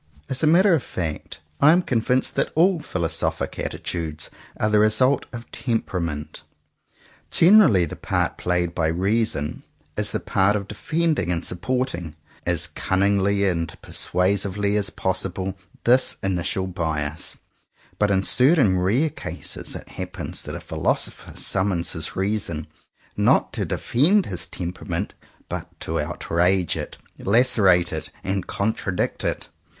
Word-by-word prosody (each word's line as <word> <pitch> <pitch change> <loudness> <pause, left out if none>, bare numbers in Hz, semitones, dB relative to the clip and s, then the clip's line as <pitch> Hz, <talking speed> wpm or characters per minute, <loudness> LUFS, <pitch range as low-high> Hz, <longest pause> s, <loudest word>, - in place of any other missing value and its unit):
As 130 -1 +1
a 155 - +3
matter 180 +4 +5
of 160 - +3
fact, 80 -8 -5 0.2
I 145 - +7
am 180 +2 +4
convinced 125 0 +1
that - - 0
all 175 +2 +4
philosophical 85 - -2
attitudes 80 -3 -4 0.3
are 105 - +2
the 105 0 +3
result 110 +6 +3
of 120 -1 -9
temperament. 85 - -3 0.9
Generally 170 - +6
the 75 - -7
part - - -1
played 90 -1 -1
by 80 -2 +1
reason 95 -2 0 0.3
is - - +1
the - - -2
part 95 +2 +2
of 100 -1 -3
defending 155 - 0
and 85 -1 -2
supporting, 90 - -2 0.3
as 85 -1 +2
cunningly 100 +3 +1
and 85 -3 -2
persuasively 100 +2 0
as 100 -2 +1
possible, 95 0 -2 0.3
this 125 +2 +4
initial 95 0 -1
bias; 80 -4 -3 0.6
but 105 - +3
in 95 -1 +2
certain 125 - +4
rare 120 - +2
cases - - -5
it - - -8
happens - - -5
that - - -6
a - - -5
philosopher - - -2
summons 95 -3 0
his 80 -1 -3
reason, 95 -5 -1 0.5
not - - +3
to - - -1
defend 180 - +2
his 90 -3 -4
temperament 90 0 -4 0.3
but - - -5
to - - -1
outrage 90 +1 +1
it, - - -6 0.2
lacerate 100 -6 +4
it, 80 - -4
and 95 0 -2
contradict 100 -3 -1
it. - - -2
95 Hz, 135 wpm, -23 LUFS, 85-115 Hz, 0.9 s, I